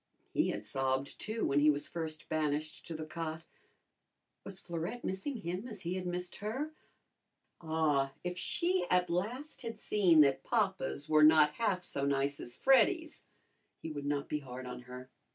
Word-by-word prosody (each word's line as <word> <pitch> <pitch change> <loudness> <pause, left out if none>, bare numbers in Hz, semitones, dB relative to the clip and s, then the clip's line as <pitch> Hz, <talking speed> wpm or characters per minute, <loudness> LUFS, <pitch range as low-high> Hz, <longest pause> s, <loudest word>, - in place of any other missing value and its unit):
He - - +3
had 105 - -3
sobbed, 135 +3 -1
too, 220 +1 -2
when 140 - +3
he 150 +1 +6
was 145 -1 +1
first 160 -2 -5
banished 155 0 -1
to 165 - -5
the 155 0 -5
cot. 160 0 -5 1.0
Was 195 -2 -6
Florette 175 +7 -4
missing 215 +9 -3
him 185 +2 -4
as 215 -5 -7
he 170 +2 -2
had 185 -1 -3
missed 180 0 -3
her? 260 +9 -3 0.9
Ah, 155 -4 +1
if 180 0 -2
she 350 - 0
at 180 -1 +3
last 235 - -2
had 230 -2 -6
seen 180 -9 +5
that 135 -2 +3
papas 195 -9 0
were 155 0 +5
not 155 -1 +7
half 185 -1 0
so 140 -5 -3
nice 140 0 +1
as 120 - -7
Freddy's, 310 +5 +3 0.6
he 160 - -4
would 145 -1 -4
not 145 -1 -1
be 150 - -1
hard 130 -2 -8
on 125 0 -6
her. 125 +1 -9
165 Hz, 170 wpm, -33 LUFS, 145-205 Hz, 1.0 s, not